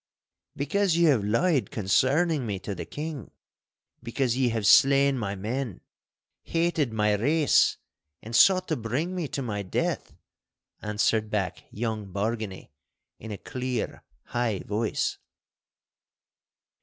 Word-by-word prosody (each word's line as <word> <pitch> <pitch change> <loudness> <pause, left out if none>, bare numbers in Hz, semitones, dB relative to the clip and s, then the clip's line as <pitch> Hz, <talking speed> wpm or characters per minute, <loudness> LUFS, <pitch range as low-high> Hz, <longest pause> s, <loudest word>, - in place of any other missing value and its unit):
'Because 170 +5 +1
ye 170 - +4
have 140 -10 +4
lied 130 - +1
concerning 140 - +2
me 105 -4 -3
to 100 +2 -5
the 85 -3 -7
King. 150 - -6 0.7
Because 120 +1 -1
ye 130 -1 +2
have 110 -3 -2
slain 140 +4 +6
my 100 -5 -3
men, 115 +2 -4 0.6
hated 165 -6 0
my 105 -1 +2
race, 145 +9 +3 0.4
and 115 +1 -6
sought 185 +6 +5
to 155 - +1
bring 130 +10 -2
me 175 -4 -2
to 140 - -4
my 105 -4 -3
death!' 95 - -2 0.7
answered 105 +1 0
back 100 -4 -2
young 110 -3 -4
Bargany 105 -3 -3 0.5
in 110 - -9
a 105 - -4
clear, 125 0 -4 0.3
high 120 -5 -1
voice. 105 +2 -1
120 Hz, 125 wpm, -27 LUFS, 105-145 Hz, 0.7 s, slain